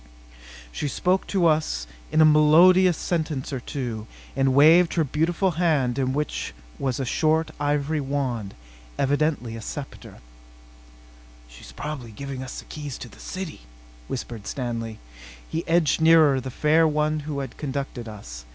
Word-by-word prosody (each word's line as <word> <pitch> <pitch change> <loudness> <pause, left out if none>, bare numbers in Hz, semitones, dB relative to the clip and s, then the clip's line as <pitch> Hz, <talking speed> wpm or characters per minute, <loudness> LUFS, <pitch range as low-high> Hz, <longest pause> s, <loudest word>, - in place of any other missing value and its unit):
She 145 - -3
spoke 180 +7 0
to 190 -4 +1
us 155 - +1 0.3
a - - -1
melodious 160 +4 +6
sentence 155 -5 -2
or 130 - -2
two, 120 -4 -5 0.3
and 135 0 +2
waved 165 +5 +6
her 165 - +3
beautiful 165 +6 0
hand 140 -7 +2
in 130 -1 +1
which 145 - -3 0.2
was 130 -2 -1
a 135 - -1
short 155 +5 +1
ivory 145 +1 0
wand, 130 -7 -3 0.4
evidently 140 -4 0
a 115 - -7
scepter. 140 +5 -8 1.3
"She's - - -13
probably 130 - -6
giving 135 +4 -6
us 130 - -7
the - - -8
keys 145 -3 -7
to 120 - -9
the - - -17
city," 185 - -6 0.5
whispered 110 - -6
Stanley. 115 -3 -4 0.5
He 165 +1 -3
edged 165 -2 +2
nearer 160 -4 +6
the 130 - -6
fair 155 +5 +3
one 150 0 0
who 150 -1 -5
had 135 -3 -5
conducted 135 -4 -4
us. - - -9
145 Hz, 145 wpm, -24 LUFS, 125-155 Hz, 1.3 s, melodious